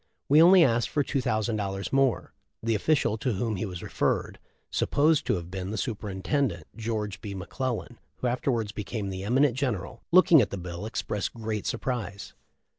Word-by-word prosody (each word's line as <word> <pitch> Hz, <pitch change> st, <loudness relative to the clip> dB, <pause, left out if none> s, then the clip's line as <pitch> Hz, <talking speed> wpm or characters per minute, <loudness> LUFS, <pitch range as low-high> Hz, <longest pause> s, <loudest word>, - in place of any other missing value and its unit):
We 150 Hz, +3 st, +6 dB
only 180 Hz, +1 st, +8 dB
asked 120 Hz, -4 st, +2 dB
for 145 Hz, -2 st, 0 dB
00 110 Hz, -5 st, 0 dB, 0.5 s
more. 135 Hz, -4 st, +1 dB, 0.3 s
The 115 Hz, 0 st, +1 dB
official 115 Hz, -1 st, +1 dB
to 125 Hz, +1 st, 0 dB
whom 110 Hz, +2 st, -1 dB
he 105 Hz, -, -2 dB
was 90 Hz, -2 st, -7 dB
referred, -, -, -1 dB, 0.2 s
— -, -, -43 dB
supposed 150 Hz, +1 st, +2 dB
to -, -, +2 dB
have 85 Hz, -1 st, -6 dB
been 95 Hz, 0 st, -4 dB
the 110 Hz, -, -3 dB
superintendent 105 Hz, -, -2 dB
George 110 Hz, -3 st, -3 dB
B. 100 Hz, -2 st, -6 dB
McClellan 120 Hz, +4 st, -4 dB, 0.2 s
who -, -, -6 dB
afterwards 120 Hz, -3 st, 0 dB
became 105 Hz, 0 st, -4 dB
the 95 Hz, 0 st, -5 dB
eminent 125 Hz, +4 st, +3 dB
general. 125 Hz, -9 st, -3 dB
— -, -, -61 dB
looking 170 Hz, -4 st, +7 dB
at 105 Hz, -, 0 dB
the 100 Hz, -, -5 dB
bill 90 Hz, +3 st, -6 dB
expressed 105 Hz, -1 st, -3 dB
great 110 Hz, -2 st, -3 dB
sur -, -, -1 dB
prise. 110 Hz, -6 st, -4 dB
110 Hz, 180 wpm, -27 LUFS, 100-130 Hz, 0.5 s, only